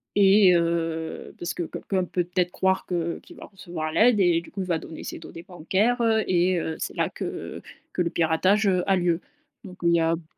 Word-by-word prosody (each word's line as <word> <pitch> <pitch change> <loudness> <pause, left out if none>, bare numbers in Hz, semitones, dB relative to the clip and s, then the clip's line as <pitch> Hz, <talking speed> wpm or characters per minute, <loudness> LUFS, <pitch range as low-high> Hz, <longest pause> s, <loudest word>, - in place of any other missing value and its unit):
et 195 -2 +6
heu, 165 -1 -2
parce 175 - -3
que 175 - -2
quelqu'un 185 +3 -2
peut 180 0 -1
peut-être 180 0 -1
croire 190 +1 0
que 170 -2 -2
qu'il - - -15
va - - -10
recevoir 170 -5 -6
l'aide 220 +6 +4
et 175 -3 +3
du 170 - -15
coup, 195 - -5
il 185 - -4
va 170 -2 +1
donner 160 - -9
ses - - -6
données 165 - -10
bancaires, 195 +7 0
heu 220 -1 +3
et 180 0 +2
heu, 160 -1 -3
c'est - - -4
là - - 0
que - - -6 0.3
que - - -1
le 170 - +1
piratage, 185 +6 +2
heu, 185 -2 +2
a 195 - +4
lieu. 175 -1 +1 0.4
Donc 185 -4 -11
il 170 - +4
y - - +3
a 165 0 +2
b 165 - -10
180 Hz, 225 wpm, -25 LUFS, 170-195 Hz, 0.4 s, et